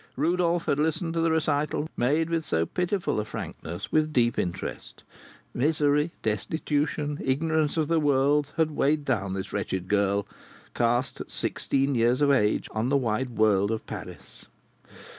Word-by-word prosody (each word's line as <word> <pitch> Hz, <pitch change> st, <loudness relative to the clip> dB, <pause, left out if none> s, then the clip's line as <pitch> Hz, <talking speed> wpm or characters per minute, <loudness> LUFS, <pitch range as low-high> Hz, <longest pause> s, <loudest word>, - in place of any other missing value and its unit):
Rodolph 170 Hz, +3 st, +1 dB
had 140 Hz, -, +1 dB
listened 160 Hz, +2 st, 0 dB
to 165 Hz, -, 0 dB
the 165 Hz, -, +2 dB
recital, 150 Hz, -1 st, 0 dB
made 155 Hz, +7 st, +1 dB
with 165 Hz, -1 st, 0 dB
so 80 Hz, -, 0 dB
painful 180 Hz, -, -1 dB
a -, -, 0 dB
frankness, 85 Hz, -5 st, -7 dB
with 155 Hz, 0 st, +2 dB
deep 120 Hz, -4 st, +2 dB
interest. 90 Hz, +1 st, -5 dB, 0.5 s
Misery, 150 Hz, +2 st, +2 dB
destitution, 145 Hz, +6 st, -1 dB
ignorance 155 Hz, +3 st, +1 dB
of 155 Hz, -2 st, +1 dB
the 165 Hz, 0 st, +2 dB
world, 145 Hz, 0 st, +3 dB
had 160 Hz, -1 st, +2 dB
weighed 150 Hz, 0 st, +1 dB
down 100 Hz, -6 st, -1 dB
this 95 Hz, -, -5 dB
wretched 95 Hz, -1 st, -2 dB
girl, 100 Hz, 0 st, +1 dB, 0.5 s
cast 120 Hz, +2 st, 0 dB
at -, -, -8 dB
sixteen 135 Hz, +1 st, -1 dB
years 120 Hz, +1 st, +2 dB
of 145 Hz, -1 st, +4 dB
age 105 Hz, -6 st, +2 dB
on 110 Hz, +3 st, -1 dB
the 140 Hz, -, +3 dB
wide 125 Hz, 0 st, -1 dB
world 105 Hz, -3 st, +2 dB
of 110 Hz, -1 st, -3 dB
Paris! -, -, -9 dB
140 Hz, 155 wpm, -26 LUFS, 110-155 Hz, 0.5 s, of